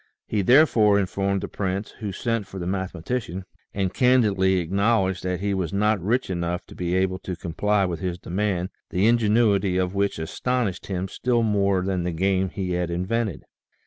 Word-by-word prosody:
He 105 Hz, -, 0 dB
therefore 110 Hz, -3 st, +5 dB
informed 100 Hz, 0 st, -1 dB
the -, -, -4 dB
prince, 100 Hz, +1 st, -3 dB
who 105 Hz, -3 st, -4 dB
sent 115 Hz, 0 st, -2 dB
for 95 Hz, -, -9 dB
the 90 Hz, -, -4 dB
mathe 95 Hz, 0 st, -2 dB
matician, 95 Hz, +1 st, -4 dB, 0.3 s
and 95 Hz, -2 st, -2 dB
candidly 105 Hz, -7 st, +3 dB
acknowledged 95 Hz, +1 st, +1 dB
that 90 Hz, -1 st, -2 dB
he 100 Hz, 0 st, 0 dB
was 90 Hz, -5 st, -2 dB
not 105 Hz, 0 st, +1 dB
rich 120 Hz, +6 st, +1 dB
enough 85 Hz, 0 st, -2 dB
to -, -, -12 dB
be 90 Hz, 0 st, -1 dB
able 95 Hz, 0 st, +1 dB
to 90 Hz, -, -5 dB
comply 100 Hz, +4 st, 0 dB
with 85 Hz, -3 st, -3 dB
his 90 Hz, -1 st, -3 dB
demand, 90 Hz, 0 st, -2 dB, 0.2 s
the 95 Hz, +3 st, +1 dB
ingenuity 105 Hz, -4 st, +3 dB
of 90 Hz, 0 st, 0 dB
which 100 Hz, 0 st, 0 dB
astonished 105 Hz, +4 st, -2 dB
him 95 Hz, -1 st, -2 dB
still 120 Hz, +4 st, 0 dB
more 100 Hz, -3 st, +2 dB
than 95 Hz, -2 st, -1 dB
the 90 Hz, -, -1 dB
game 95 Hz, +2 st, +1 dB
he 95 Hz, -1 st, -4 dB
had 90 Hz, -1 st, -1 dB
invented. 95 Hz, +3 st, -2 dB
95 Hz, 180 wpm, -24 LUFS, 90-105 Hz, 0.3 s, therefore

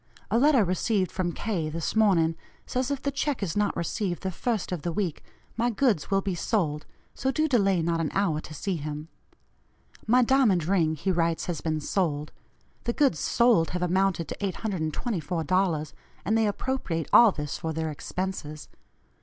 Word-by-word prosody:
A 230 Hz, -, +3 dB
letter 275 Hz, -4 st, +5 dB
received 185 Hz, +1 st, 0 dB
from 180 Hz, -2 st, -1 dB
K. 175 Hz, -6 st, -2 dB
this 165 Hz, +5 st, -3 dB
morning 175 Hz, -7 st, +3 dB, 0.3 s
says 255 Hz, +1 st, -1 dB
if 280 Hz, -1 st, -3 dB
the 280 Hz, -, 0 dB
check 275 Hz, -4 st, -1 dB
is 170 Hz, -5 st, -2 dB
not 205 Hz, 0 st, +1 dB
received 175 Hz, 0 st, -2 dB
the 190 Hz, -, -1 dB
first 220 Hz, +2 st, -2 dB
of 175 Hz, -4 st, -3 dB
the 170 Hz, -, -2 dB
week, 180 Hz, -4 st, -2 dB, 0.3 s
my 235 Hz, +1 st, +1 dB
goods 225 Hz, -, +1 dB
will 195 Hz, 0 st, +2 dB
be 195 Hz, -1 st, -2 dB
sold 165 Hz, -5 st, -1 dB, 0.3 s
so 265 Hz, -, -1 dB
do 310 Hz, +4 st, +1 dB
delay 195 Hz, -, +2 dB
not 165 Hz, 0 st, 0 dB
an 155 Hz, -, -1 dB
hour 170 Hz, -6 st, +1 dB
to 155 Hz, -, -10 dB
see 190 Hz, +2 st, -2 dB
him. 150 Hz, +1 st, -6 dB, 1.0 s
My 250 Hz, +3 st, +5 dB
diamond 235 Hz, -, +3 dB
ring 165 Hz, -4 st, +2 dB
he 190 Hz, +6 st, -1 dB
writes 165 Hz, -2 st, 0 dB
has 170 Hz, -4 st, -3 dB
been 155 Hz, -1 st, -1 dB
sold; 150 Hz, -4 st, -1 dB, 0.5 s
the 235 Hz, -, 0 dB
goods 285 Hz, -1 st, +2 dB
sold 235 Hz, -9 st, +3 dB
have 180 Hz, 0 st, -2 dB
amounted 180 Hz, -2 st, +1 dB
to -, -, -5 dB
$824, 180 Hz, -, -1 dB, 0.3 s
and 215 Hz, +5 st, +2 dB
they 225 Hz, -1 st, +3 dB
appropriate 205 Hz, -, -2 dB
all 235 Hz, -3 st, +8 dB
this 150 Hz, -4 st, -5 dB
for 160 Hz, -, -3 dB
their 160 Hz, 0 st, -2 dB
expenses. 155 Hz, -1 st, -5 dB
185 Hz, 175 wpm, -27 LUFS, 160-220 Hz, 1.0 s, all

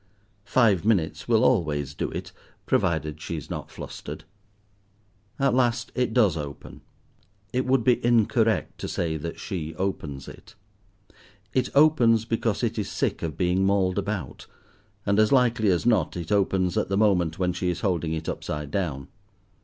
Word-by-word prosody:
Five 110 Hz, -8 st, +3 dB
minutes 100 Hz, -7 st, 0 dB
will 115 Hz, -2 st, +3 dB
always 75 Hz, -, +1 dB
do -, -, -3 dB
it, -, -, -6 dB, 0.3 s
provided 80 Hz, -2 st, 0 dB
she 85 Hz, -, -4 dB
is 75 Hz, -, -8 dB
not -, -, -5 dB
flustered. -, -, -8 dB, 1.1 s
At 135 Hz, -2 st, +2 dB
last 120 Hz, -1 st, +1 dB
it 125 Hz, -2 st, 0 dB
does 110 Hz, -8 st, +3 dB
open. 75 Hz, -3 st, -7 dB, 0.7 s
It 130 Hz, +1 st, 0 dB
would 130 Hz, -2 st, +3 dB
be 125 Hz, +1 st, +2 dB
incorrect 115 Hz, -1 st, +2 dB
to -, -, -4 dB
say 80 Hz, -2 st, -2 dB
that 85 Hz, +2 st, -6 dB
she 80 Hz, -6 st, -5 dB
opens 75 Hz, -7 st, -4 dB
it. -, -, -13 dB, 1.0 s
It 130 Hz, -1 st, +1 dB
opens 125 Hz, -7 st, +5 dB
because 115 Hz, -1 st, -1 dB
it 115 Hz, -1 st, -1 dB
is 105 Hz, -, -3 dB
sick -, -, -1 dB
of 80 Hz, -3 st, -4 dB
being 90 Hz, +1 st, +1 dB
mauled 95 Hz, -1 st, +2 dB
about; 100 Hz, -8 st, -5 dB, 0.6 s
and, 100 Hz, +1 st, +2 dB
as 110 Hz, 0 st, +4 dB
likely 120 Hz, -5 st, +3 dB
as 90 Hz, +1 st, +1 dB
not, 105 Hz, -9 st, +2 dB
it 85 Hz, -2 st, -6 dB
opens 95 Hz, -3 st, +2 dB
at -, -, -2 dB
the 100 Hz, -, 0 dB
moment 90 Hz, -7 st, +2 dB
when 90 Hz, -1 st, 0 dB
she 90 Hz, +1 st, -1 dB
is 85 Hz, -1 st, -3 dB
holding 85 Hz, -4 st, 0 dB
it 80 Hz, 0 st, -4 dB
upside 75 Hz, -2 st, -4 dB
down. 75 Hz, -9 st, -2 dB
95 Hz, 160 wpm, -25 LUFS, 80-115 Hz, 1.1 s, opens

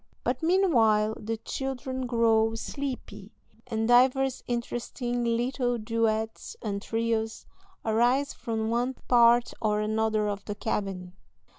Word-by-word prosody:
But 250 Hz, +1 st, -1 dB
meanwhile 235 Hz, -, +3 dB
the 225 Hz, +1 st, -3 dB
children 260 Hz, +1 st, -4 dB
grow 225 Hz, -2 st, +3 dB
sleepy, 270 Hz, +3 st, -6 dB, 0.3 s
and 225 Hz, 0 st, -1 dB
divers 260 Hz, +2 st, +3 dB
interesting 240 Hz, 0 st, -3 dB
little 245 Hz, +1 st, 0 dB
duets 220 Hz, 0 st, -2 dB
and 200 Hz, -2 st, -3 dB
trios 225 Hz, 0 st, -2 dB, 0.4 s
arise 240 Hz, +6 st, +2 dB
from 225 Hz, -2 st, -3 dB
one 245 Hz, +3 st, 0 dB
part 240 Hz, 0 st, +5 dB
or 210 Hz, -2 st, +1 dB
another 215 Hz, 0 st, 0 dB
of 200 Hz, -1 st, -3 dB
the 205 Hz, -, -4 dB
cabin. 195 Hz, -4 st, -3 dB
230 Hz, 115 wpm, -27 LUFS, 220-245 Hz, 0.4 s, part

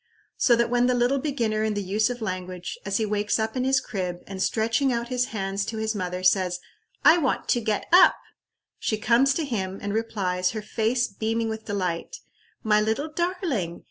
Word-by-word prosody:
So 240 Hz, -, +4 dB
that 235 Hz, 0 st, +1 dB
when 245 Hz, 0 st, +3 dB
the 250 Hz, -, +2 dB
little 245 Hz, +3 st, +2 dB
beginner 230 Hz, -7 st, -1 dB
in 215 Hz, -1 st, 0 dB
the 205 Hz, -, -2 dB
use 205 Hz, +4 st, +1 dB
of 245 Hz, -2 st, -5 dB
language, 185 Hz, -2 st, -4 dB
as 195 Hz, 0 st, 0 dB
he 220 Hz, -, 0 dB
wakes 210 Hz, 0 st, 0 dB
up 220 Hz, +1 st, -2 dB
in 255 Hz, -, 0 dB
his 265 Hz, +1 st, +3 dB
crib, 180 Hz, -6 st, -4 dB
and 195 Hz, -1 st, -6 dB
stretching 230 Hz, +6 st, +1 dB
out 235 Hz, 0 st, -2 dB
his 250 Hz, -1 st, +1 dB
hands 195 Hz, -3 st, -3 dB
to 225 Hz, -, -5 dB
his 220 Hz, 0 st, -1 dB
mother 180 Hz, -2 st, -4 dB
says, 185 Hz, -1 st, +2 dB, 0.5 s
"I 335 Hz, +2 st, +7 dB
want 275 Hz, -5 st, -1 dB
to 240 Hz, -, +2 dB
get 215 Hz, -2 st, -1 dB
up" 370 Hz, +1 st, +8 dB, 0.6 s
she 215 Hz, -, -1 dB
comes 240 Hz, +5 st, +3 dB
to 330 Hz, -, 0 dB
take 285 Hz, -, -6 dB
him, 190 Hz, -5 st, -2 dB
and 200 Hz, 0 st, -4 dB
replies, 190 Hz, -5 st, -1 dB
her 215 Hz, -2 st, -4 dB
face 230 Hz, +3 st, 0 dB
beaming 225 Hz, +3 st, -2 dB
with 220 Hz, 0 st, -5 dB
delight, 190 Hz, -, -3 dB, 0.5 s
"My 210 Hz, -2 st, +3 dB
little 225 Hz, +9 st, -1 dB
darling! 310 Hz, -, -2 dB
220 Hz, 205 wpm, -25 LUFS, 195-245 Hz, 0.6 s, up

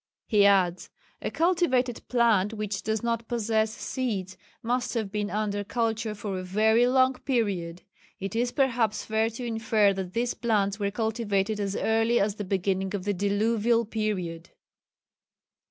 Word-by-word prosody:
He 205 Hz, -2 st, +4 dB
adds, 185 Hz, -3 st, +2 dB, 0.3 s
"a -, -, -2 dB
cultivated 315 Hz, -9 st, +1 dB
plant 225 Hz, -4 st, +2 dB
which 210 Hz, -2 st, -3 dB
does 220 Hz, 0 st, -2 dB
not 230 Hz, -1 st, -1 dB
possess 220 Hz, -2 st, 0 dB
seeds 210 Hz, -6 st, -3 dB, 0.3 s
must 245 Hz, +2 st, -1 dB
have 220 Hz, -4 st, -2 dB
been 210 Hz, -1 st, -2 dB
under 205 Hz, -1 st, -1 dB
culture 225 Hz, 0 st, -1 dB
for 200 Hz, -2 st, -4 dB
a -, -, -5 dB
very 220 Hz, +6 st, +3 dB
long 260 Hz, +1 st, +4 dB
period... 195 Hz, -10 st, -1 dB, 0.4 s
it 195 Hz, +2 st, -5 dB
is 240 Hz, +1 st, +1 dB
perhaps 240 Hz, -6 st, +1 dB
fair 220 Hz, +1 st, +1 dB
to 230 Hz, +2 st, -7 dB
infer 220 Hz, -3 st, +2 dB
that 190 Hz, -2 st, -5 dB
these 235 Hz, +2 st, 0 dB
plants 210 Hz, -3 st, 0 dB
were 200 Hz, -1 st, 0 dB
cultivated 215 Hz, -1 st, -1 dB
as 200 Hz, -1 st, -2 dB
early 225 Hz, +2 st, +2 dB
as 205 Hz, +1 st, +1 dB
the 210 Hz, -, -5 dB
beginning 190 Hz, 0 st, -1 dB
of 190 Hz, -, -4 dB
the 205 Hz, +1 st, 0 dB
Diluvial 220 Hz, +4 st, +1 dB
period." 190 Hz, -7 st, -3 dB
215 Hz, 155 wpm, -27 LUFS, 200-230 Hz, 0.4 s, He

